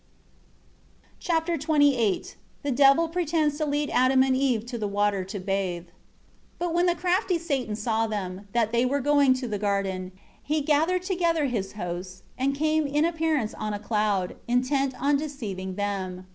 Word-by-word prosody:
Chapter 335 -1 0
XXVIII 285 - +2 0.3
The 285 - -1
Devil 275 +5 +5
pretends 320 -3 0
to 310 - 0
lead 290 0 -1
Adam 260 +1 +4
and 265 -1 +2
Eve 255 -5 +1
to 240 -1 -5
the 210 - -1
water 205 -1 0
to 200 +2 -6
bathe. 185 -2 -2
1 170 - -28 0.6
But 350 -1 -2
when 350 +1 +3
the 350 - +2
crafty 365 +1 +1
Satan 275 -10 -2
saw 225 +1 0
them, 200 -2 -5
that 230 -1 +1
they 235 +1 +2
were 270 +3 +1
going 285 -1 +4
to 255 -1 -4
the 210 -3 -3
garden, 195 -2 -1 0.3
he 305 +1 -1
gathered 320 +5 +2
together 340 -5 +1
his 215 -7 -2
host, 185 -1 -6
and 275 +2 0
came 310 +1 +1
in 295 +3 +1
appearance 320 -8 0
on 215 -1 -3
a - - -5
cloud, 210 -3 -1
intent 260 +2 0
on 280 +2 +2
deceiving 210 -11 -5
them. 190 -2 -3
255 Hz, 170 wpm, -26 LUFS, 205-300 Hz, 0.6 s, Devil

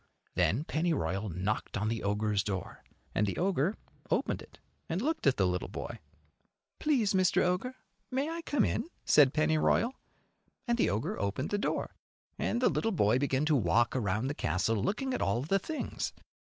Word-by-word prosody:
Then 120 +10 +2
Pennyroyal 155 - -1
knocked 95 +6 -2
on 105 +2 -1
the 115 0 -1
ogre's 105 0 +1
door, 95 -4 -4 0.3
and 105 - +2
the 100 - -2
ogre 185 0 +1 0.3
opened - - 0
it - - -15 0.3
and 165 - 0
looked 305 - 0
at 135 - +4
the 95 - +3
little 90 0 -1
boy. - - -6 0.8
"Please, 250 -10 +2
Mr. 185 -1 +3
Ogre, 185 +9 0 0.3
may 270 +3 0
I 335 +1 -4
come 295 -3 +1
in?" - - -1 0.2
said 145 -4 +6
Pennyroyal; 155 - +2 0.7
and 235 0 +1
the - - +3
ogre 105 +3 -2
opened 100 +8 -2
the 205 - +1
door, - - -2 0.5
and 240 - 0
the - - +6
little 225 - 0
boy 125 - +3
began 140 +1 +1
to 155 -1 +3
walk 115 +2 +2
around 110 -1 0
the 140 - -1
castle 95 - 0
looking 255 - -1
at - - -2
all 115 +6 +1
the 195 +7 +2
things. 310 - -4
140 Hz, 175 wpm, -31 LUFS, -, 0.8 s, said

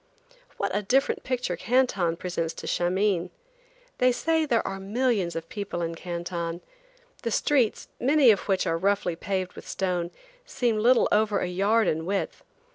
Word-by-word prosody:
What 200 -1 -1
a 205 - +1
different 260 +7 +1
picture 255 -1 -2
Canton 230 -9 +1
presents 170 -2 -3
to - - -8
Shameen. 180 0 +1 0.7
They 255 0 +5
say 320 +5 +1
there 235 -4 +1
are 195 0 -4
millions 205 -3 0
of 165 0 -4
people 200 -4 -4
in 165 0 -2
Canton. 170 0 -4 0.6
The 230 - -2
streets, 245 0 +1
many 270 -1 +5
of 205 - -1
which 190 -2 +1
are 165 0 0
roughly 195 -2 +1
paved 185 +1 -3
with - - -11
stone, 180 -2 -1 0.3
seem 240 - 0
little 240 +3 +4
over 210 -1 +3
a - - -1
yard 200 +5 +2
in 160 +2 -1
width. 200 0 -2
200 Hz, 160 wpm, -26 LUFS, 175-235 Hz, 0.7 s, They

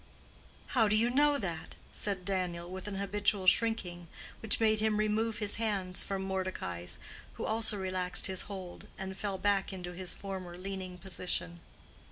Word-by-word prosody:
"How 225 -4 +5
do 205 - +3
you 230 +3 +3
know 290 +2 +5
that?" 170 - -4 0.2
said 195 -3 -1
Daniel, 180 -3 -1
with 185 +2 -6
an 205 - -4
habitual 200 0 +1
shrinking 185 -4 +3 0.3
which 220 - +2
made 220 -1 +4
him 215 -1 +2
remove 215 +1 +1
his 210 -2 +1
hands 195 -5 0
from 195 -1 -2
Mordecai's, 185 - -2 0.4
who - - -4
also 220 -1 +4
relaxed 185 -1 +2
his 190 -2 +1
hold, 185 -3 -7
and 190 0 -5
fell 195 0 -2
back 200 0 +2
into 180 -2 -5
his 180 0 -2
former 185 -3 -6
leaning 185 -1 -5
position. 180 -2 -1
195 Hz, 160 wpm, -32 LUFS, 185-210 Hz, 0.4 s, How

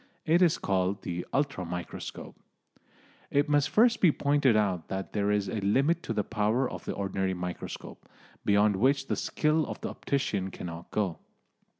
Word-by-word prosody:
It 165 +3 +4
is 170 -3 +4
called 95 0 0
the 90 0 -4
"ultra 140 -8 0
microscope." 90 0 -6 0.9
It 145 +1 +2
must 145 -1 +2
first 235 +1 +4
be 180 - +6
pointed 140 -5 +2
out 95 -6 0
that 95 0 -5
there 105 -1 +1
is 105 -1 +1
a 110 -3 -3
limit 140 - +2
to - - -5
the 105 -2 0
power 110 +5 +1
of - - -8
the - - -2
ordinary 95 -1 -1
microscope, 90 0 -7 0.3
beyond 105 0 +3
which 135 +5 +2
the - - +1
skill 155 +1 +1
of - - -6
the - - -3
optician 105 -9 -1
cannot 85 -2 -8
go. 100 -6 -1
105 Hz, 170 wpm, -29 LUFS, 95-140 Hz, 0.9 s, be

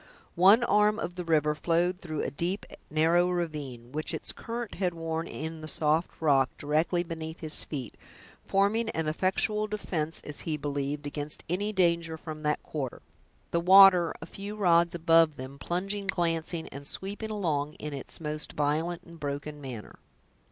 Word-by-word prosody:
One 195 +7 +6
arm 210 -2 +3
of 175 -6 -3
the 180 0 -5
river 155 -2 +2
flowed 175 +4 0
through 155 -4 -3
a - - -2
deep, 175 +7 -2 0.2
narrow 165 +3 +3
ravine, 150 -9 -4
which 155 +2 -3
its - - -1
current 230 -1 -5
had 180 -2 +1
worn 165 0 -3
in 160 +1 -5
the 155 - -7
soft 155 +2 +1
rock, 135 -4 +4
directly 160 +4 +1
beneath 160 -1 -6
his 155 -2 -2
feet, 135 -6 -5 0.5
forming 210 +4 +2
an 160 -7 -2
effectual 190 +6 +1
defense, 170 -7 -1
as 150 - -5
he 155 -2 -2
believed, 145 0 -3
against 145 +1 -4
any 195 +5 -1
danger 170 -4 +1
from 155 -1 -8
that 150 0 0
quarter; 135 -5 -5 0.5
the 170 - +2
water, 185 -1 +8
a - - -6
few 200 +2 -7
rods 170 -4 +3
above 165 -2 +4
them, 130 +1 -8
plunging, 195 +5 -2
glancing, 165 -2 0
and 140 +1 -9
sweeping 205 +6 -5
along 155 -8 -1
in 150 -1 -6
its 135 - -2
most 150 -1 -4
violent 155 +4 -1
and 170 -1 -14
broken 145 +1 -4
manner. 125 -7 -8
165 Hz, 165 wpm, -29 LUFS, 150-180 Hz, 0.5 s, water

